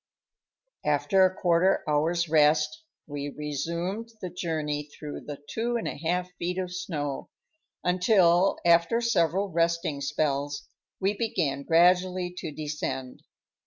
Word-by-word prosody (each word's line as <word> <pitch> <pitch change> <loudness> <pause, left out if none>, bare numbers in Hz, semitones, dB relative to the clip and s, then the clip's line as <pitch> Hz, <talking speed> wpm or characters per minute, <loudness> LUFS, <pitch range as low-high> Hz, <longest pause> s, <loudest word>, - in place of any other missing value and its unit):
After 190 -2 +3
a 185 - +2
quarter 175 +1 +2
hour's 165 +3 +1
rest, 155 - +3 0.2
we 145 -1 -5
resumed 170 - -3
the 185 -4 -5
journey 155 -4 -2
through 150 0 -8
the 145 -1 -7
two 235 +2 -2
and 230 - -3
a - - -3
half 180 +4 -2
feet 180 +1 -2
of 180 -1 -3
snow, 150 -7 -4 0.5
until, 180 0 +4
after 170 +6 +4
several 195 -4 +1
resting 170 -3 0
spells, 145 0 -1 0.3
we 195 +2 +1
began 150 -11 -1
gradually 180 +3 +3
to 160 - -5
descend. 145 -3 -4
170 Hz, 125 wpm, -27 LUFS, 150-185 Hz, 0.5 s, until